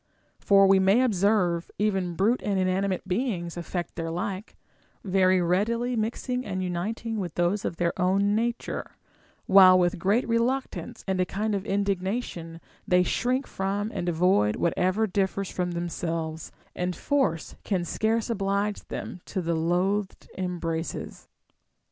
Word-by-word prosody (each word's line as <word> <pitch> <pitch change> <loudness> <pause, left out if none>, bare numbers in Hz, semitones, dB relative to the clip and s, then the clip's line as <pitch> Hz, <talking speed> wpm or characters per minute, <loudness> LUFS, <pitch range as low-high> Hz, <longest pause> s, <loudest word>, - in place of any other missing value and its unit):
For, 195 -1 +5
we 195 0 +5
may 195 +6 +4
observe, 195 -6 +1
even 190 -4 0
brute 215 +8 +2
and 200 -2 -1
inanimate 185 0 0
beings 185 -4 -2
affect 175 0 -4
their 165 -1 -4
like, 185 +4 -4 0.5
very 185 -1 +3
readily 230 +8 +1
mixing 240 +3 -2
and 190 -5 -3
uniting 215 +5 -3
with 180 -4 -4
those 175 +4 0
of - - -2
their 170 -1 +1
own 195 +3 +2
nature; 235 +2 -2 0.5
while 190 -1 +8
with 175 -1 +1
great 205 +8 +2
reluctance 240 0 -1
and 190 -1 0
u 185 - +3
kind 210 +3 -2
of 200 +1 -2
indignation 195 -3 -2 0.3
they 180 0 +4
shrink 255 +7 0
from 200 +3 -2
and 175 - -2
avoid 160 - +3
what 170 - 0
eΛ'er 185 +5 +2
differs 195 -1 -1
from 180 -1 -2
themselves, 165 -2 -3 0.2
and 180 0 -2
force 265 - 0
can 185 -4 -1
scarce 220 +5 0
oblige 200 -1 -1
them 180 - -6
to - - -3
the 170 -1 -1
loathed 185 +5 0
embraces. 170 -3 -4
190 Hz, 140 wpm, -26 LUFS, 175-210 Hz, 0.5 s, while